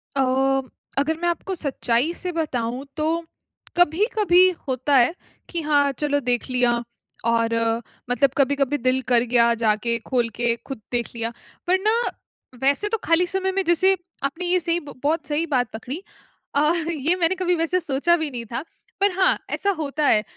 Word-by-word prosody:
अ, 270 - +2
म 265 0 +1 0.3
अगर 315 +3 +1
मैं 345 - 0
आपको 375 +3 -3
सच्चाई 275 0 0
से 365 -1 -4
बताऊँ 260 -5 -2
तो, 325 +2 -1 0.5
कभी-कभी 365 +2 +4 0.2
होता 260 +2 +1
है, 250 +5 +5 0.4
कि 340 -2 -2
हाँ, 290 -2 +2
चलो 285 +1 0
देख 245 +1 +1
लिया 250 -1 +3 0.6
और 230 0 +1 0.6
मतलब 250 +3 +3
कभी-कभी 280 +1 +2
दिल 255 +1 +1
कर 240 0 +6
गया 235 -1 +5
जाके, 225 +2 +2
खोल 240 -3 +1
के 240 -1 +1
खुद 270 -6 -6
देख 240 -1 -1
लिया। 230 0 -2 0.4
पर 375 +1 +3
ना, 430 +3 +2 0.7
वैसे 285 +10 +2
तो 450 - 0
खाली 335 +2 +3
समय 380 +1 -1
में 390 0 0
जैसे, 375 +3 +4 0.3
आपने 305 +6 -2
ये 360 +1 +2
सही 340 0 0
ब 290 -4 -11
बहुत 310 +3 0
सही 305 +2 0
बात 245 -2 +1
पकड़ी 255 - -6 0.5
अ, 300 +2 +4 0.2
ये 320 +3 +2
मैंने 360 +1 +1
कभी 360 -1 +1
वैसे 330 +2 0
सोचा 330 +2 +2
भी 315 -2 -2
नहीं 235 -2 -6
था। 235 - -2 0.4
पर 400 -1 +4
हाँ, 375 - +4
ऐसा 400 - -1
होता 295 +1 -1
है, 210 - +4
290 Hz, 175 wpm, -23 LUFS, 250-345 Hz, 0.7 s, कर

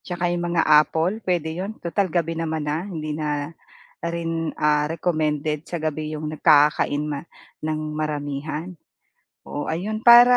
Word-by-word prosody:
saka 175 -1 -2
'yong 175 - -1
mga 170 -1 +2
apple 160 +7 +4
puwede 175 -3 -1
'yon 210 +3 -4
tutal 190 +3 +1
gabi 165 0 0
naman 160 -2 -2
na. 155 +6 -2
Hindi 155 -5 -4
na 150 0 -2 0.5
rin 165 -1 -2 0.4
recommended 155 -2 -1
sa 170 0 -5
gabi 155 0 -2
'yong 155 0 -4
nagkakakain 150 0 +3 0.4
ng 155 0 -1 0.2
maramihan. 150 +3 -3 0.7
Oo, 145 - -5
ayun 205 +7 -2
para 240 +1 +9
160 Hz, 135 wpm, -23 LUFS, 150-175 Hz, 0.7 s, para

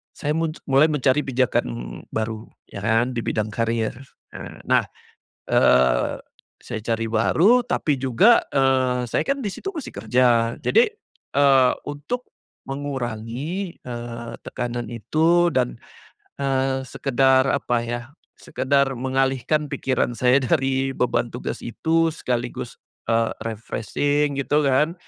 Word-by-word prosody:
saya 145 - -4
muj 165 -1 -2
mulai 135 +3 +6
mencari 145 -2 +2
pijakan 130 -2 +1 0.5
baru, 110 0 -3 0.3
ya 100 - -7
kan, 115 +3 +2
di - - -1
bidang 110 0 -1
karir. 115 +1 -1 0.7
Nah, - - +3 0.7
eee, 65 -1 +3 0.5
saya - - -4
cari 115 0 -1
baru 185 - +4
tapi 150 -3 0
juga, 135 - +5
eee, 130 -2 +2
saya - - +1
kan 275 0 0
di 205 - -1
situ 390 - -5
masih 305 - -6
kerja, 115 +2 +2
jadi, 460 -1 +4 0.5
eee, 135 -3 +5 0.2
untuk 150 - -5 0.4
mengurangi, 135 - -4
eee, 120 -1 -6
tekanan 120 -1 -4
itu 165 +9 +2
dan, - - 0 0.7
eee, 135 -1 0
sekedar 130 0 +2
apa 120 -4 0
ya 120 0 -3 0.4
sekedar 135 +1 0
mengalihkan 135 +3 0
pikiran 130 -2 -1
saya 125 +2 +4
dari 135 -1 +1
beban 125 -1 0
tugas 125 - -5
itu 165 +7 +1
sekaligus, 120 -4 -4 0.3
eee, 115 0 +2 0.2
refreshing 145 +6 -1
gitu 150 +2 +1
kan 150 +5 +2
130 Hz, 120 wpm, -23 LUFS, 120-145 Hz, 0.7 s, mulai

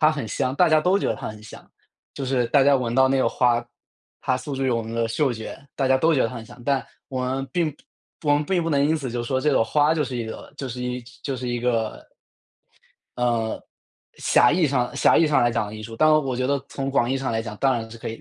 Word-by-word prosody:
它 155 - +6
很 145 -7 -4
香， 130 +4 -1
大 175 +5 +4
家 155 -1 +4
都 180 +5 +3
觉 - - -1
得 - - 0
它 - - -6
很 110 0 -10
香， 105 - -13 0.4
就 140 - -4
是 130 -2 +1
大 135 +4 +4
家 140 +1 +5
闻 120 -3 0
到 130 +1 +5
那 135 0 +2
个 130 - +3
花， 120 -2 +2 0.6
它 130 - +1
诉 135 +1 -5
诸 135 - -1
于 130 - +2
我 115 -1 +1
们 115 +1 -7
的 115 0 +1
嗅 135 +4 +1
觉， 115 +4 -8
大 135 - +1
家 130 0 +4
都 160 +4 +3
觉 130 - +3
得 - - +1
它 125 - -8
很 115 -1 -8
香， 120 +1 -14
但 140 -1 +1 0.2
我 130 -1 -3
们 135 +1 -2
并 160 -4 0 0.5
我 145 - +3
们 145 - +1
并 175 +2 0
不 165 - -2
能 140 -2 +2
因 155 +2 +2
此 135 -5 -4
就 120 0 -3
说 130 +2 -1
这 150 +2 +2
朵 130 - +4
花 145 +6 +2
就 155 - +1
是 130 -3 -4
一 120 - -2
个 110 - -8
就 135 - -5
是 125 +1 -5
一 125 0 -3 0.2
就 135 -2 -3
是 125 0 -5
一 120 0 -2
个 115 -3 -1 1.1
呃， 120 -2 0 0.6
狭 120 - +4
义 170 -2 +3
上 125 -3 0
狭 - - +4
义 165 - +5
上 150 -4 +3
来 120 - +3
讲 115 -2 -1
的 105 - -8
艺 110 - -8
术， 115 +1 -8
当 155 +5 +5
然 155 - +4
我 130 -3 -2
觉 130 0 0
得 140 +1 +1
从 135 0 -3
广 120 -3 +1
义 135 - +1
上 135 -2 -2
来 110 0 -1
讲， 110 -2 -7
当 135 +3 +2
然 115 -2 -3
是 115 - -10
可 - - -5
以， 115 - -7
130 Hz, 305 characters per minute, -23 LUFS, 120-140 Hz, 1.1 s, 它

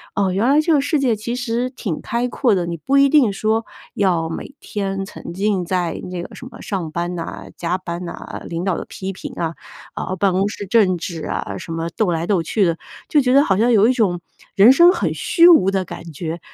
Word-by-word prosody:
“哦， 195 -2 +1
原 200 +6 +1
来 295 +2 +5
这 325 +1 +2
个 295 - +4
世 285 +2 0
界 255 -4 +2
其 230 +3 -4
实 245 0 -2
挺 215 - -5
开 240 +1 -1
阔 240 -5 +2
的。 175 -2 -1
你 170 0 -4
不 270 - +1
一 275 0 +5
定 265 -8 +4
说， 220 +3 0 0.3
要 175 -5 +1
每 275 - -7
天 195 -2 -3
沉 170 - -9
浸 195 -1 0
在 175 -2 -1
那 180 -1 -5
个 - - -10
什 255 - -10
么 - - -13
上 185 -7 -3
班 175 +2 -3
呐， 170 -2 -6
加 175 +2 -1
班 175 -1 -6
呐， 170 - -8
领 170 +1 -4
导 190 -3 0
的 - - -5
批 190 0 -6
评 - - -8
啊， 165 -1 -2 0.4
然 - - -3
后 185 - -2
办 195 +1 +2
公 190 +2 +1
室 205 - -6
政 195 -3 +3
治 165 -1 -6
啊， - - -4
什 165 - -8
么 165 +1 -3
斗 210 -2 +1
来 165 0 -1
斗 185 -1 +1
去 200 +6 0
的。 165 -1 0 0.3
“就 295 - +4
觉 250 0 +2
得 280 +1 +6
好 190 -7 +1
像 235 +4 +3
有 215 0 +5
一 255 - +3
种， 185 -8 0 0.3
人 210 +6 +8
生 340 +6 +7
很 - - -1
虚 340 0 +4
无 195 - +6
的 195 -1 0
感 170 0 -9
觉。 165 +3 -5
195 Hz, 260 characters per minute, -20 LUFS, 175-235 Hz, 0.4 s, 人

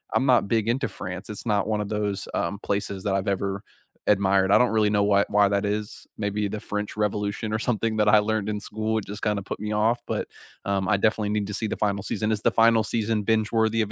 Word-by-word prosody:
I'm 135 - +3
not 120 -7 +4
big 110 0 +1
into 135 +3 0
France, 90 +1 -7
it's 105 +3 -7
not 105 -2 +1
one 105 -1 0
of 105 - -4
those, 105 -2 -2
um, 100 +1 -2
places 100 -1 -2
that 100 - 0
I've 95 - -2
ever 100 0 -1 0.5
admired, 95 -1 +3
I - - +8
don't 125 - +4
really 110 -2 +3
know 105 -1 +2
why 100 0 +3
why 105 -1 +4
that 100 0 0
is, 105 +1 -4
maybe 105 0 -1
the 105 +1 -5
French 105 0 -4
Revolution 105 +1 -1
or 110 - 0
something 115 -2 -1
that 105 0 +2
I 105 0 +7
learned 105 -1 -1
in 105 -1 -2
school, 110 +1 -2
it - - -8
just 105 +2 -7
kind 105 -2 0
of 100 - -4
put - - -5
me 105 0 -3
off, 110 +3 +2
but, - - -2 0.4
um, 100 -1 0
I 100 - +3
definitely 110 0 +1
need 105 -1 -1
to 105 - -5
see 110 +2 -2
the - - -3
final 100 -2 0
season, 110 +2 -1
is 105 -1 -1
the - - +2
final 115 -1 +4
season 110 -2 -1
binge 110 0 +1
worthy 110 0 +2
of 105 -1 -2
105 Hz, 255 wpm, -25 LUFS, 100-110 Hz, 0.5 s, I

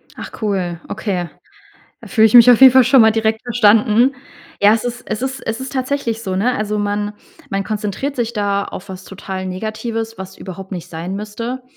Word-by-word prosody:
Ach, - - -8
cool. 185 -5 -2
Okay. 190 -5 -3 0.7
Da - - -12
fühle 220 -3 +4
ich 220 - -1
mich 240 0 +9
auf 245 0 +5
jeden 265 -1 +9
Fall 260 -1 +6
schon 260 +2 +5
mal 220 -1 +6
direkt 220 0 0
verstanden. 235 +2 +3 0.5
Ja, 205 +1 +6
es 225 - -3
ist 245 0 -4
es 215 +2 -4
ist 265 0 -3
es 225 +3 -3
ist 260 - -6
tatsächlich 260 -4 -2
so, 190 -4 -3
ne? 245 +6 +1
Also 210 0 -2
man 205 0 -2 0.4
man 195 0 -2
konzentriert 215 +7 -3
sich 235 -1 -2
da 200 -2 -1
auf 195 - -9
was 185 0 -9
total 190 -1 -7
Negatives, 220 +3 -5
was 190 0 -9
überhaupt 190 +1 -9
nicht 180 -1 -6
sein 170 +3 -6
müsste. 230 +5 -5
215 Hz, 200 wpm, -18 LUFS, 195-240 Hz, 0.7 s, mich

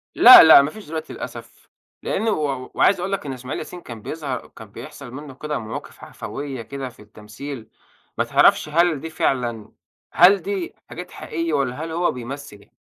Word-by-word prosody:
لأ، 250 -6 +11
لأ. 160 -3 +9
ما 140 +2 -2
فيش 215 -6 -12
دلوقتي 160 0 -6
للأسف - - -10 0.3
لأنه 225 0 -1
و 155 -6 -1
وع 130 -2 -4
وعايز 195 - +3
أقول 180 +2 -3
لك 195 -5 -3
إن 135 - -4
إسماعيل 130 +1 -6
ياسين 180 -1 -9
كان 115 -7 -10
بيظهر 145 -3 -5
كان 110 -2 -14
بيحصل 140 0 -10
منه 145 +1 -9
كده 150 0 -4
مواقف 110 0 -8
عَفويّة 140 -3 -7
كده 135 +3 -7
في 115 - -18
التمثيل، 110 +4 -10 0.5
ما - - +2
تعرفش - - +3
هل 165 -1 +2
دي 160 - -7
فعلًا 120 -8 -2 0.4
هل 190 +2 +6
دي 190 -1 -4
حاجات 180 0 -9
حقيقية، 165 0 -4
والّا 140 +1 -1
هل 165 - -7
هو 175 +2 0
بيمثّل 125 -3 -9
145 Hz, 180 wpm, -22 LUFS, 125-165 Hz, 0.5 s, لأ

